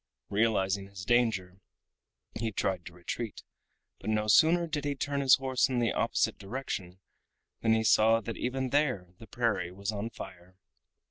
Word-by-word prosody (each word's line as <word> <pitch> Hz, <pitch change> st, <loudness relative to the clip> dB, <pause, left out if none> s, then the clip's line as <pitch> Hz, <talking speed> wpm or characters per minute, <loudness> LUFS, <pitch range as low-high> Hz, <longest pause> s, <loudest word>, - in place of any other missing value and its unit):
Realizing 100 Hz, -2 st, +1 dB
his 100 Hz, -2 st, -9 dB
danger 110 Hz, -7 st, +1 dB, 0.7 s
he 110 Hz, 0 st, -2 dB
tried 95 Hz, -3 st, -2 dB
to 85 Hz, -, -10 dB
retreat, 95 Hz, +5 st, -5 dB, 0.6 s
but -, -, -5 dB
no 105 Hz, 0 st, +1 dB
sooner 160 Hz, +10 st, +5 dB
did 155 Hz, -3 st, -3 dB
he 145 Hz, -1 st, -1 dB
turn 140 Hz, 0 st, -2 dB
his 135 Hz, -2 st, +7 dB
horse 130 Hz, 0 st, +1 dB
in 130 Hz, -, -1 dB
the 120 Hz, -2 st, +1 dB
opposite -, -, 0 dB
direction 95 Hz, -4 st, -5 dB, 0.6 s
than 115 Hz, -1 st, +3 dB
he 110 Hz, 0 st, +2 dB
saw 110 Hz, +1 st, +5 dB
that 115 Hz, +1 st, -6 dB
even 130 Hz, 0 st, -2 dB
there 130 Hz, -12 st, 0 dB
the 115 Hz, -, -12 dB
prairie 105 Hz, -8 st, -1 dB
was 100 Hz, +3 st, -4 dB
on 105 Hz, +2 st, -4 dB
fire. 90 Hz, -4 st, -11 dB
110 Hz, 160 wpm, -30 LUFS, 95-130 Hz, 0.7 s, his